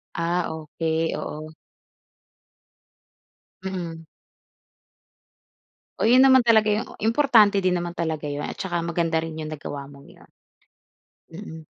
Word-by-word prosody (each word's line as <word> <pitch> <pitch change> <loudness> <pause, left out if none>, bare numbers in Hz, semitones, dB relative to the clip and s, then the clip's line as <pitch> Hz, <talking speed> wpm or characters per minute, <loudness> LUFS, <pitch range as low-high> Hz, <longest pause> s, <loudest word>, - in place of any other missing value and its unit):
Ah, 170 +1 0
okey. 160 +1 -2
Oo. 155 +1 -6 2.1
Mm. 170 -4 -5 1.9
Oh, - - +1
yun 250 +3 +6
naman 260 -2 +6
talaga 220 -2 +5
yung 210 +3 0 0.2
importante 225 -3 +4
din 185 -2 +2
naman 175 0 -3
talaga 160 -3 -2
yun, 145 +1 -4
at - - -5
saka 175 -3 -2
maganda 170 -1 0
rin 160 0 -3
yung 155 -1 -6
nagawa 145 -2 -7
mong 140 -1 -15
yun. - - -18 1.1
Mhm. 160 -4 -9
170 Hz, 115 wpm, -24 LUFS, 160-205 Hz, 2.1 s, yun